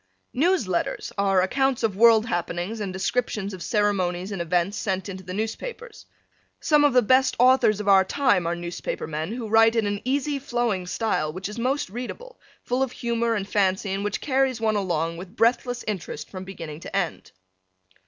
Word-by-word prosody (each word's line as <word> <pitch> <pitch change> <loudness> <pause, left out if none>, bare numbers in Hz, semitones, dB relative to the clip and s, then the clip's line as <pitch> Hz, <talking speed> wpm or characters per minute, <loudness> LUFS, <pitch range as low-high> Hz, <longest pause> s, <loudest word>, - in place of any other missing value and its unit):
News 335 - +2
letters 175 -2 -2
are 195 -2 +2
accounts 265 +5 0
of 215 -4 +1
world 225 +1 +6
happenings 175 +3 -3
and 200 -3 -3
descriptions 200 +1 -2
of 185 - -8
ceremonies 195 -4 0
and 195 -3 -3
events 175 +3 0
sent 190 -3 -2
into 190 -1 -7
the 180 - -8
newspapers. 470 - -5 0.5
Some 300 -1 +3
of 290 -3 +4
the 250 -1 +5
best 260 +4 +3
authors 245 -4 +4
of 210 - -5
our 195 -1 +6
time 190 -5 +1
are 170 - 0
newspaper 175 0 -5
men 155 +4 -4
who 235 -1 -4
write 225 +1 +5
in 225 -2 +2
an 205 0 -2
easy 280 +2 -1
flowing 240 -8 -1
style 180 -7 -1
which 185 +4 -5
is 210 +3 -7
most 265 +4 0
readable, 370 - -7 0.2
full 250 +2 -1
of 265 -2 0
humor 235 -1 -1
and 200 -2 -3
fancy 195 -1 +1
and 195 +1 -2
which 205 -1 -2
carries 265 -3 +1
one 220 -1 +1
along 170 -4 -1
with 185 +4 -10
breathless 245 +2 +1
interest 180 -7 -5
from 185 -1 -7
beginning 165 -5 -8
to 185 - -8
end. 185 -4 -2
210 Hz, 185 wpm, -24 LUFS, 185-245 Hz, 0.5 s, world